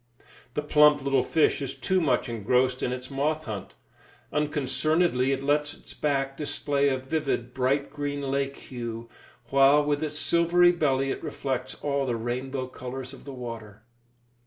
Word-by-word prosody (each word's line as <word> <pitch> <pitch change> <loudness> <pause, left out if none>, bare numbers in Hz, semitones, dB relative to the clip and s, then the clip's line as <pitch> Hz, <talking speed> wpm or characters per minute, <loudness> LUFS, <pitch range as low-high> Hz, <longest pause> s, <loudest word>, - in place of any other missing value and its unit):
The 150 - -1
plump 150 -1 +5
little 135 -1 +3
fish 155 +1 +2
is 135 -1 -4
too 185 +7 +1
much 140 -4 +1
engrossed 125 +3 +1
in 125 - 0
its 125 +1 -5
moth 150 +3 0
hunt. 110 -7 -6 0.6
Unconcernedly 150 -1 +1
it 135 0 -1
lets 150 +1 +1
its - - -11
back 135 -2 -1
display 140 -1 0
a 130 - 0
vivid, 130 -3 -2
bright 135 +2 0
green 145 0 -3
lake 140 0 -1
hue, 115 -2 -7 0.4
while 140 +2 +6
with 145 0 0
its 150 -1 -2
silvery 170 +2 +4
belly 135 -5 +1
it - - -5
reflects 130 -2 -3
all 140 -2 0
the 120 - 0
rainbow 130 +3 -3
colours 130 0 -7
of - - -13
the 140 - -7
water. 115 -4 -8
135 Hz, 160 wpm, -27 LUFS, 125-150 Hz, 0.6 s, while